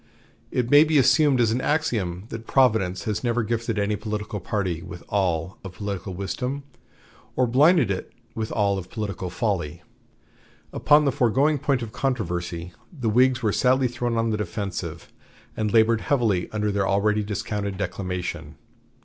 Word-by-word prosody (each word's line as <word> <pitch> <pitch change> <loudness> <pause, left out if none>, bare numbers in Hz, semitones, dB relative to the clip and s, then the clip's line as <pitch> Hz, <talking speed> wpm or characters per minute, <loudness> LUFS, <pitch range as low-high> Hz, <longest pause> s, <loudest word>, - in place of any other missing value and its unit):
It 125 -1 -1
may 145 +1 +9
be 155 -1 +2
assumed 140 +1 +4
as 115 -2 +3
an 125 +3 0
axiom 110 - -1
that 115 0 -7
Providence 105 -9 +2
has 110 +1 -2
never 120 -1 +1
gifted 115 0 -2
any 105 +1 +1
political 105 0 -4
party 90 -3 -2
with 85 +1 -9
all 90 -3 -1
of 95 -2 -8
political 100 -2 -5
wisdom 125 +9 -3 0.7
or 130 - +3
blinded 135 - +4
it 95 - -4 0.2
with 110 -1 -4
all 100 -2 +1
of 90 -1 -9
political 100 -4 -4
folly. 90 -4 -2 0.9
Upon 150 0 +4
the 140 - +3
foregoing 135 +6 +2
point 135 -3 0
of 110 - -7
controversy 90 -10 -3 0.2
the 130 -10 -2
Whigs 125 +1 +3
were 105 -2 +1
sadly 130 0 +3
thrown 120 -1 -2
on 115 0 +1
the 110 - 0
defensive, 95 -6 -5 0.4
and 110 -1 -1
labored 115 0 +4
heavily 115 -10 +1
under 105 -1 -1
their 100 -1 0
already 105 +2 +2
discounted 100 0 -3
declamation. 90 -4 -4
105 Hz, 160 wpm, -24 LUFS, 95-125 Hz, 0.9 s, may